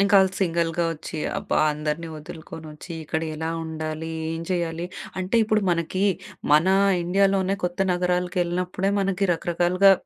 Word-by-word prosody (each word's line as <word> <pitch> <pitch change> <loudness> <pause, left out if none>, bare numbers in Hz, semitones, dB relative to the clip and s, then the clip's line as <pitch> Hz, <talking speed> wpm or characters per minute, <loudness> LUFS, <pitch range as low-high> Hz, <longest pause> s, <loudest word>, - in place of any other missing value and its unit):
ఇంకా 200 0 +6 0.2
సింగిల్‌గా 170 -2 +1
వచ్చి, 160 0 -7 0.2
అబ్బా! - - -2 0.2
అందరిని 150 +2 -3
వదులుకొని 160 +1 -9
వచ్చి, 160 +3 -10
ఇక్కడ 160 +2 -2
ఎలా 160 +1 -3
ఉండాలి, 160 0 -4 0.2
ఏం 165 0 -3
చేయాలి 170 -1 -1 0.3
అంటే 185 +5 0
ఇప్పుడు 215 0 +2
మనకి 170 +3 0 0.5
మన 155 +5 +5 0.3
ఇండియాలోనే 195 +1 +2
కొత్త 175 +1 -2
నగరాలకు 180 +1 0
ఎళ్ళినప్పుడే, 180 +2 -1
మనకి 195 0 +1
రకరకాలుగా 175 +3 +3
175 Hz, 130 wpm, -24 LUFS, 160-185 Hz, 0.5 s, ఇంకా